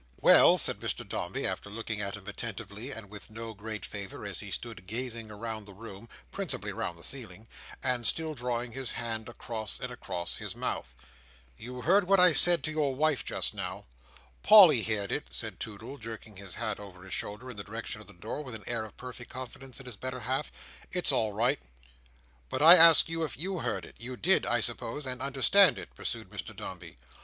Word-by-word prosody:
"Well," - - +7
said - - +3
Mr - - -3
Dombey, - - -3
after - - -3
looking 110 0 -4
at 100 0 -4
him 100 - -14
attentively, 105 +2 -5
and 115 -6 -5
with 105 +2 -10
no 115 +1 -7
great 105 -1 -6
favour, 100 0 -6
as 100 -3 -1
he 100 - -4
stood 100 -1 -5
gazing 115 0 -3
round 110 0 -6
the 100 - -12
room 110 +1 -11 0.2
(principally 130 - -4
round 95 -5 -4
the 85 - -10
ceiling) 110 -5 -4 0.4
and 125 -2 0
still 160 +4 +1
drawing 120 -2 -3
his 130 0 -2
hand 115 -1 -4
across 115 -3 -4
and - - -5
across 85 0 -3
his - - -6
mouth. - - -4 0.6
"You 125 - -8
heard 190 +4 +4
what 195 0 +5
I 180 0 +9
said 175 +2 +7
to 155 - -2
your 150 -4 0
wife 150 -2 +1
just - - -1
now?" - - -6 0.6
"Polly 185 - +8
heerd 105 -3 -1
it," - - -3
said - - -5
Toodle, 110 +6 -7
jerking 110 -2 -8
his 95 -2 -4
hat 105 -2 -2
over 95 -3 -11
his 95 - -6
shoulder 105 +5 -3
in 115 - -12
the 100 - -5
direction 105 0 -6
of 105 - -11
the - - -12
door, 105 +11 -6
with 125 -5 -6
an 105 - -8
air 120 -1 -2
of 110 - -11
perfect 125 -2 -8
confidence 130 0 -7
in 135 - -9
his 125 -5 -7
better 130 +1 -5
half. 130 +5 -1 0.4
"It's 180 -4 +1
all 110 -5 +1
right." 110 - +1 0.9
"But 130 - -1
I 165 +2 +12
ask 165 -2 +9
you 165 0 -2
if 155 - -4
you 185 +4 -3
heard 115 -6 -2
it. - - -15
You 125 +2 -6
did, 190 +8 +3
I 120 -1 +2
suppose, 120 +5 -3
and 130 -1 -3
understood 140 +9 +5
it?" - - -9
pursued - - -5
Mr - - -6
Dombey. - - -9
115 Hz, 205 wpm, -29 LUFS, 105-135 Hz, 0.9 s, I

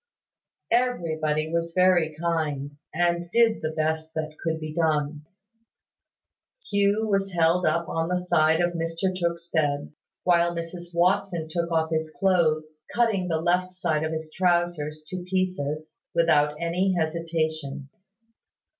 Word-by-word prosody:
Everybody 160 -11 +1
was 170 0 -1
very 180 -4 +4
kind, 155 -4 -1 0.2
and 170 +1 0
did 230 +2 +3
the 155 - -1
best 160 0 -2
that 155 -1 -3
could 160 -1 -1
be 155 -1 -6
done. 150 -2 0 1.4
Hugh 205 +1 +2
was 195 -2 0
held 170 +1 +3
up 170 +1 +1
on 165 0 -1
the 180 - +1
side 160 -2 +3
of 175 0 +1
Mr 165 +3 -1
Tooke's 170 -1 -2
bed, 145 -3 0 0.3
while 175 -1 +3
Mrs 170 +1 -6
Watson 175 -1 +1
took 170 0 -1
off 160 -1 +1
his 160 0 0
clothes, 155 -5 +1
cutting 220 -6 +2
the 165 -2 0
left 180 +2 +1
side 160 -4 0
of 160 - -1
his 160 -1 -5
trousers 175 -4 0
to 185 -1 -5
pieces, 155 -5 -2 0.2
without 150 -3 +3
any 180 +3 +1
hesitation. 155 -4 -2
165 Hz, 135 wpm, -26 LUFS, 155-180 Hz, 1.4 s, very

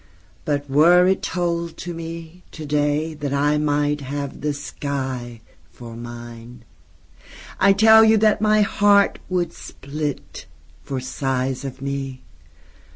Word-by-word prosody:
But 145 -1 -1
were 170 +6 +5
it 190 +1 +2
told 170 -2 -2
to 175 0 -6
me, 165 +1 -8
to 155 - -7
day, 150 +2 0
That 145 -2 -4
I 145 +1 +2
might 145 0 0
have 140 +1 -5
the 150 - -1
skyFor 125 -5 -7
mine, 120 0 -10 0.9
I 195 +1 +5
tell 220 +2 +7
you 220 0 +5
that 215 0 +3
my 215 0 +4
heartWould 200 -4 +2
split, 145 +1 -6 0.3
for 135 -1 -4
size 130 0 -2
of 135 0 -7
me. 135 -1 -4
145 Hz, 120 wpm, -21 LUFS, 135-175 Hz, 0.9 s, tell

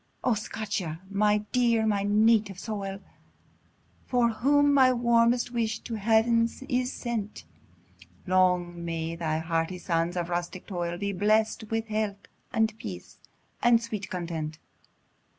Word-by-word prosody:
O 250 - +3
Scotia! 200 -6 -4
my 210 +1 +2
dear, 235 -3 +3
my 205 -2 +1
native 210 -1 +3
soil! 195 -2 -5 1.1
For 245 -2 +3
whom 285 +6 +3
my 260 -2 +6
warmest 235 0 +2
wish 225 -2 -1
to 235 - -7
Heaven 225 +2 +3 0.2
is 250 -2 0
sent, 225 -4 -4 0.8
Long 180 -2 +2
may 165 0 -3
thy 160 -2 -1
hardy 165 +2 -1
sons 170 0 -1
of 175 0 -2
rustic 175 +1 -3
toil 175 -3 -3
Be 200 +1 -2
blest 215 +3 +1
with 225 0 -1
health, 210 -2 -2 0.2
and 220 -2 +1
peace, 90 -4 -8 0.4
and 240 -1 +5
sweet 220 -4 -5
content! 165 -3 -4
210 Hz, 130 wpm, -27 LUFS, 175-230 Hz, 1.1 s, my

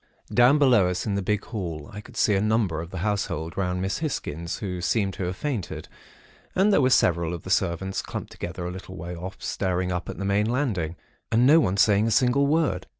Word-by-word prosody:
"Down, 125 +4 +6
below 125 -10 +5
us 90 - -2
in 105 - -1
the 100 - 0
big 105 +2 -1
hall, 85 -9 -5
I 105 - -6
could - - -14
see 105 - +3
a 95 - +2
number 105 -7 +1
of 85 - -8
the 95 - -7
household 90 -6 -2
round 90 -1 -1
Miss 95 - -1
Hisgins, 85 - -3
who 90 -4 -4
seemed 95 +1 0
to 95 - -4
have 90 +1 -3
fainted; 125 -6 -4 0.7
and 200 +3 +4
there 145 - +5
were 130 - +4
several 85 -8 +2
of 85 - -9
the 95 - -6
servants 95 0 0
clumped - - -6
together 85 +1 -6
a 90 - -3
little 95 +1 -9
way 85 +2 -6
off, 90 +3 -7
staring 90 -1 -1
up 90 -1 -3
at - - -6
the 100 - -4
main 100 +2 +1
landing, 105 - -1 0.4
and 115 +2 +4
no 155 +5 +7
one 100 - +1
saying 105 +1 +4
a - - +1
single 125 +4 +3
word. 145 - +1
95 Hz, 225 wpm, -25 LUFS, 90-115 Hz, 0.7 s, no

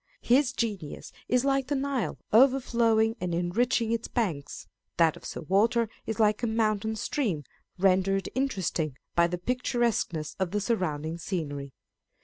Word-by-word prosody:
His 255 +2 +4
genius 205 - -4 0.2
is 250 +1 +2
like 270 -1 +1
the 290 - 0
Nile 270 -2 -1 0.2
overflowing 230 -3 +4
and 175 -2 -1
enriching 225 +7 +1
its 230 0 -1
banks; 175 - -3 0.3
that 165 -2 +4
of - - -14
Sir - - -5
Walter 215 +7 +2 0.2
is 220 0 -3
like 215 0 +3
a 240 - 0
mountain 220 -1 0
stream 205 - -1 0.3
rendered 190 0 +2
interesting 185 - -1 0.2
by 170 0 +4
the 180 +1 -3
picturesqueness 235 - -1
of 190 -2 0
the 210 +3 -1
surrounding 170 -7 -2
scenery. 145 -6 -4
215 Hz, 140 wpm, -28 LUFS, 175-240 Hz, 0.3 s, His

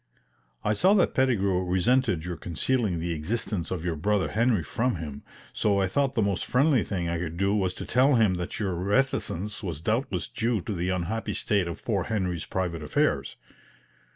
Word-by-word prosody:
I 105 - +2
saw 190 - +4
that 190 - +3
Pettigrew 100 -8 +2
resented 90 0 +1
your 90 -1 -3
concealing 90 - 0
the 85 +1 -2
existence 90 +2 -2
of 90 -2 -4
your 85 -2 -1
brother 95 +1 +1
Henry 110 -3 +2
from 125 - -1
him, 75 -4 -6 0.3
so 100 -2 +1
I 95 - +3
thought 135 +8 0
the 110 - +2
most 100 -2 0
friendly 135 -2 +3
thing 90 -4 -3
I 85 0 -1
could 85 -1 -4
do 100 +2 +2
was 95 -3 0
to - - -6
tell 130 +3 +4
him 110 -5 +4
that 90 -1 -4
your 100 -4 -1
reticence 100 0 -1
was 85 -8 -4
doubtless 110 - -1
due 115 -1 -1
to 105 - -4
the 90 0 -2
unhappy 95 +5 -2
state 100 -5 +1
of 85 - -7
poor 100 -6 0
Henry's 90 -6 -2
private 90 -3 -2
affairs. 75 - 0
95 Hz, 185 wpm, -27 LUFS, 85-115 Hz, 0.3 s, saw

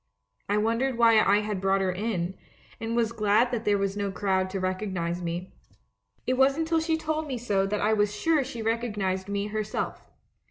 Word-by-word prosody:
I 205 - +2
wondered 230 +4 +1
why 230 -2 +6
I 205 +1 +4
had 210 -3 -3
brought 195 0 +2
her 190 -1 +1
in, 185 -2 -2 0.5
and 225 0 -3
was 230 -1 +1
glad 220 +2 +2
that 230 -2 -2
there 205 -1 +3
was 195 0 -1
no 200 -1 -2
crowd 190 -1 0
to 195 +1 -3
recognize 185 -2 -2
me. 175 +2 -4 0.7
It 255 0 0
wasn't 275 +4 +3
till 330 0 +2
she 320 0 0
told 315 0 -2
me 260 -3 -3
so 200 -5 0
that 210 +1 -1
I 215 +1 +3
was 205 -1 +2
sure 310 +5 +2
she 240 -3 -6
recognised 205 -5 -1
me 200 0 -1
herself. 215 0 -3
210 Hz, 195 wpm, -27 LUFS, 195-235 Hz, 0.7 s, why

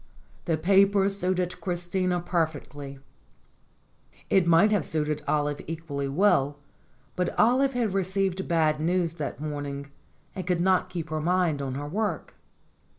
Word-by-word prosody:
The 165 -3 +1
paper 195 +3 +4
suited 185 -2 -1
Christina 180 0 -1
perfectly. 150 -5 -3 1.3
It 180 -3 +4
would 170 +6 +5
have 205 -6 +2
suited 150 -1 -2
Olive 145 -1 0
equally 155 -4 -4
well, 145 -3 +2 0.6
but 180 -1 -2
Olive 265 +4 +4
had 235 -5 0
received 190 0 -1
bad 155 -3 +2
news 170 +1 0
that 140 - -4
morning, 145 -2 -5 0.4
and 185 -3 -6
could 180 -2 +1
not 185 +1 +2
keep 170 -4 -5
her 155 0 -1
mind 170 -3 +1
on 135 -2 -3
her 145 +1 -4
work. 195 0 -2
170 Hz, 135 wpm, -27 LUFS, 150-190 Hz, 1.3 s, would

